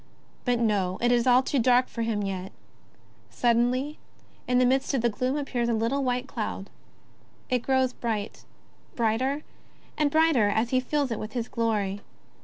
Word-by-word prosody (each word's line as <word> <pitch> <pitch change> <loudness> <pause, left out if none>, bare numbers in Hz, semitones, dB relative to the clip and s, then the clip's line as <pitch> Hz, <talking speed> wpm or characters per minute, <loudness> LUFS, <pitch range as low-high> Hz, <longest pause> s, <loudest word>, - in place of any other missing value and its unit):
But 245 -1 +2
no, 200 -5 0
it 240 +1 +2
is 240 0 +2
all 250 +1 +5
too 275 - 0
dark 250 +1 +4
for 230 - -6
him 225 -2 -1
yet. 190 -1 -4 0.8
Suddenly, 245 +5 +1 0.5
in 250 - +2
the 250 - +4
midst 265 +2 +1
of 255 - +1
the 240 - +4
gloom 255 +6 -1
appears 245 -5 -1
a 230 - +2
little 235 +6 0
white 250 0 -1
cloud. 210 -5 -5 0.8
It 250 -2 +2
grows 260 0 +1
bright, 220 -3 -4 0.5
brighter 255 +6 0 0.5
and 300 -2 +2
brighter 310 -8 +3
as 220 +3 0
he 255 - +3
fills 280 0 -1
it 225 - -2
with 215 0 -6
his 240 -2 -2
glory. 210 -4 -1
245 Hz, 170 wpm, -26 LUFS, 220-260 Hz, 0.8 s, all